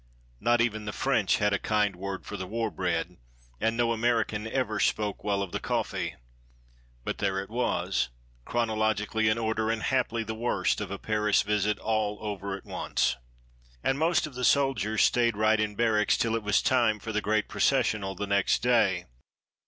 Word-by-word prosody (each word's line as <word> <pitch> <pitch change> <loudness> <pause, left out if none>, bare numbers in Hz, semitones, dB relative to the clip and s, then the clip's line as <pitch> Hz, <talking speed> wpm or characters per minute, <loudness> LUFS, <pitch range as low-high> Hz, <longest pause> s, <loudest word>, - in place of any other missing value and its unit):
Not 120 0 +3
even 110 -2 -1
the 105 - -3
French 120 -8 +1
had 105 -1 +1
a 100 - +1
kind 105 -3 +1
word 95 +1 -5
for - - -6
the 95 -2 -5
war 115 +2 -2
bread, 90 -1 -2 0.4
and 115 +1 0
no 120 -1 +2
American 115 -2 0
ever 110 -3 -1
spoke 105 0 0
well 100 -1 0
of 95 - -7
the - - -2
coffee. - - -2 0.9
But - - -4
there 95 0 0
it 100 +2 -7
was 125 - 0 0.3
chronologically 110 - 0
in 110 - +1
order, 110 -1 -1
and 115 -1 -1
haply 120 -3 0
the 110 0 -4
worst 115 -1 0
of 105 - -4
a 100 - -4
Paris 105 -1 +1
visit 105 0 0
all 110 -1 -1
over 100 -2 -4
at - - -16
once. 65 - -1 0.7
And 135 +1 +1
most 165 +1 +2
of 150 - -9
the 125 0 -5
soldiers 125 -7 +2
stayed 120 -3 +2
right 110 0 +3
in 105 -1 -1
barracks 110 -2 +2
till 115 -1 +1
it 115 - -1
was 105 -1 +2
time 120 -4 +3
for 110 +2 -6
the 110 -1 0
great 105 +1 0
processional 110 -7 +1
the 100 - -3
next 100 -1 +1
day. 100 -8 +3
110 Hz, 185 wpm, -28 LUFS, 100-115 Hz, 0.9 s, Not